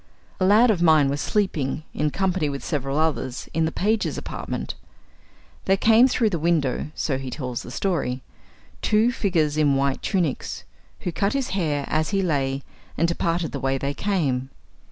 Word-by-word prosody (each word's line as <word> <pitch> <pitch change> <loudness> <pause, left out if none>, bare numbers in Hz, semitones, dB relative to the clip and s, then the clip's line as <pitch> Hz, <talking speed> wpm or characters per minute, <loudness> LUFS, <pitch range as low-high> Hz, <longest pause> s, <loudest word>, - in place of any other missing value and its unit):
A 185 - +2
lad 220 +5 +6
of 185 -5 -1
mine 155 -4 +5
was 140 +1 -2
sleeping, 160 -9 -1
in 150 0 0
company 185 -2 0
with 140 -1 -5
several 140 -2 -2
others, 150 -5 -1
in 165 0 +2
the 160 - -1
pages' 215 +5 0
apartment. - - -5 0.9
There 195 0 +3
came 225 +5 +6
through 230 -4 +1
the 170 - -1
windows 155 -6 +1
(so 135 -3 -1
he 135 -1 -5
tells 125 -3 -4
the - - -9
story) 130 -5 -1 0.6
two 220 +3 +3
figures 165 - 0
in 145 -3 +3
white 135 -1 0
tunics, 175 -9 -1 0.4
who 180 - -2
cut 200 +4 0
his 275 -2 -1
hair 150 -7 -1
as 155 0 0
he 195 -1 +1
lay, 135 -5 0 0.3
and 165 - +3
departed 170 0 -1
the 140 - -4
way 135 0 0
they 140 +1 -2
came. 140 -10 -1
160 Hz, 175 wpm, -24 LUFS, 140-195 Hz, 0.9 s, lad